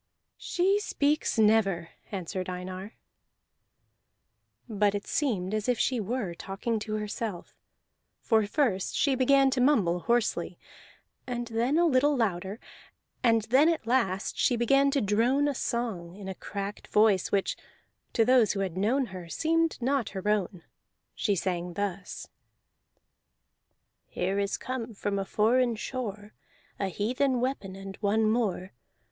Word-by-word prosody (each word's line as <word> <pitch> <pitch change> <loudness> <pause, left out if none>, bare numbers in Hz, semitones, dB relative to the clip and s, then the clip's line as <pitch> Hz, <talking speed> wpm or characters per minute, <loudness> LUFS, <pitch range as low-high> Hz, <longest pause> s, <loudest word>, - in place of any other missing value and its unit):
"She 385 +3 +1
speaks 300 - 0
never," 205 -6 +3 0.2
answered 185 -1 -4
Einar. 185 +3 -6 1.7
But 205 -2 +1
it 205 - -4
seemed 210 - -1
as 215 +2 -1
if 245 - +2
she 255 +1 +1
were 215 -3 -2
talking 195 +6 -3
to 215 0 -4
herself, 210 -3 -5 0.6
for 220 -3 +2
first 210 -7 0
she 280 - +2
began 270 +1 +4
to 260 -1 0
mumble 205 -11 +3
hoarsely, 235 +4 0 0.7
and 240 -1 -3
then 235 +6 +1
a 345 - +4
little 290 -1 +3
louder, 195 -2 -1 0.6
and 230 -3 +3
then 265 +8 +4
at 330 -8 -1
last 230 -6 0
she 245 - +3
began 275 +4 +3
to 275 -1 +1
drone 235 +8 +2
a 290 - 0
song, 220 -9 -3
in 200 -1 -9
a 190 - -3
cracked 200 +2 -6
voice 210 -3 +3
which, 200 -1 +1 0.6
to 225 - +3
those 250 -3 +4
who 195 - -2
had 185 -3 -3
known 245 +8 +2
her, 180 -2 -8
seemed 330 - +1
not 260 -1 0
her 190 - -4
own. 195 -4 0 0.5
She 205 - 0
sang 175 -1 -2
thus: 195 0 -4 1.8
"Here 195 +2 -1
is 200 0 -1
come 245 -3 -5
from 200 0 -2
foreign 235 +4 +2
shore, 215 -3 -5 0.5
A 195 - 0
heathen 250 +7 0
weapon 240 -7 -3
and 195 0 -8
one 215 +1 +2
more. 210 - -1
220 Hz, 140 wpm, -28 LUFS, 195-255 Hz, 1.8 s, began